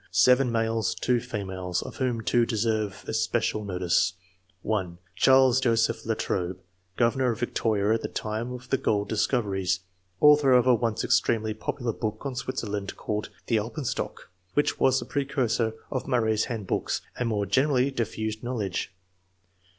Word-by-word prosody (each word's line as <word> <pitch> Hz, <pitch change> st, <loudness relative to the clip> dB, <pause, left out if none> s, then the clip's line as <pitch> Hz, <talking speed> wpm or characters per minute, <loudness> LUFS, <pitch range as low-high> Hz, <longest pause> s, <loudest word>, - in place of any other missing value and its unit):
— -, -, -31 dB
7 125 Hz, +8 st, +4 dB
males, 115 Hz, -1 st, 0 dB
2 125 Hz, -1 st, +1 dB
females, 95 Hz, -6 st, -3 dB
of -, -, -9 dB
whom 125 Hz, -3 st, -1 dB
2 120 Hz, +1 st, +2 dB
deserve 110 Hz, -3 st, -1 dB
especial 110 Hz, -1 st, 0 dB
notice: 90 Hz, -2 st, +1 dB, 0.2 s
— 95 Hz, 0 st, -40 dB
(1) 95 Hz, -5 st, -2 dB, 0.2 s
Charles 130 Hz, -1 st, +5 dB
Joseph 115 Hz, -3 st, +1 dB
Latrobe, 90 Hz, +1 st, -1 dB, 0.4 s
governor 125 Hz, +2 st, +2 dB
of 110 Hz, -, -10 dB
Victoria 110 Hz, -3 st, +1 dB
at 115 Hz, -, 0 dB
the -, -, -3 dB
time 110 Hz, +3 st, -4 dB
of 125 Hz, 0 st, -8 dB
the 135 Hz, -, +2 dB
gold 105 Hz, -5 st, 0 dB
discoveries; 100 Hz, -5 st, 0 dB, 0.4 s
author 150 Hz, -3 st, +6 dB
of 125 Hz, -1 st, +5 dB
a 130 Hz, -, +6 dB
once 115 Hz, -1 st, 0 dB
extremely 110 Hz, -2 st, +2 dB
popular 115 Hz, +2 st, -3 dB
book 110 Hz, +3 st, -4 dB
on 140 Hz, -, -2 dB
Switzerland, 105 Hz, -6 st, -3 dB
called 105 Hz, 0 st, -3 dB, 0.2 s
the 115 Hz, -, +2 dB
"Alpenstock," 120 Hz, -, -4 dB, 0.2 s
which 145 Hz, -, +1 dB
was 130 Hz, 0 st, +4 dB
the -, -, -6 dB
precursor 130 Hz, -5 st, 0 dB, 0.2 s
of 130 Hz, -, -3 dB
Murray's 110 Hz, -5 st, +2 dB
handbooks 110 Hz, -6 st, -2 dB, 0.2 s
and 120 Hz, -2 st, 0 dB
more 105 Hz, -2 st, 0 dB
generally 130 Hz, +5 st, +2 dB
diffused 110 Hz, -3 st, -3 dB
knowledge. 105 Hz, -6 st, -3 dB
115 Hz, 150 wpm, -27 LUFS, 105-125 Hz, 0.4 s, author